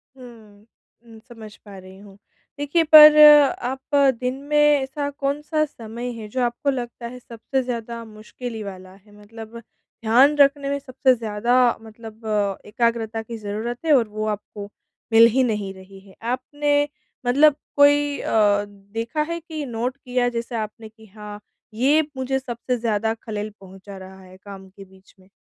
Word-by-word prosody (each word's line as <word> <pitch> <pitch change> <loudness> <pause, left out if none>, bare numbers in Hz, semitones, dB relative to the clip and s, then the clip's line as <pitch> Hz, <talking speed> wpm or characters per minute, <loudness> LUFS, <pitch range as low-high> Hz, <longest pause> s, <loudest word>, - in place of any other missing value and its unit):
हुँ। 220 -5 -16 0.4
उम, 225 -1 -15
समझ 220 -3 -12
पा 200 -2 -12
रही 185 0 -13
हूँ। 200 -1 -16 0.4
देखिए, 290 +4 +1
पर 305 -1 +9 0.5
आप 265 +3 -4 0.2
दिन 250 0 -2
में 300 - +2
ऐसा 290 -1 +2
कौन-सा 290 +2 -2
समय 235 -2 -8
है 225 -2 -8
जो 255 +5 -3
आपको 240 +4 -1
लगता 240 -2 -5
है 250 +1 -10
सबसे 245 +3 -4
ज़्यादा 235 -1 -5
मुश्किल 220 +3 -9
ही 220 -1 -6
वाला 185 -2 -10
है। 205 +2 -22
मतलब 225 +2 -11 0.5
ध्यान 255 +7 +4
रखने 280 0 +3
में 280 0 -2
सबसे 260 -1 +1
ज़्यादा 230 +1 -1 0.3
मतलब, 220 0 -13 0.4
एकाग्रता 225 0 -1
की 225 +1 -8
ज़रूरत 220 +6 -6
है 310 - +4
और 235 -3 0
वो 215 +1 -5
आपको 205 -1 -6 0.4
मिल 225 +1 +8
ही 260 +2 +2
नहीं 210 -5 -2
रही 190 +1 -15
है। 190 -1 -19
आपने 290 +5 -1 0.4
मतलब 280 +4 +4 0.2
कोई 290 0 +3
अ, 205 -2 +2
देखा 210 +7 -5
है 335 +2 -3
कि 315 -3 -7
नोट 245 +1 -4
किया 250 -2 -1
जैसे 235 0 -5
आपने 220 0 -6
कि 220 0 -19
हाँ, 210 0 -11 0.3
ये 275 +7 +3 0.2
मुझे 265 +1 -1
सबसे 250 -1 -4
ज़्यादा 220 -1 -1
खलल 215 -2 -6
पहुँचा 195 +1 -12
रहा 190 0 -12
है 185 0 -16
काम 195 0 -12
के 195 +1 -14
बीच 190 +1 -22
में? 185 0 -23
230 Hz, 165 wpm, -22 LUFS, 210-265 Hz, 0.5 s, पर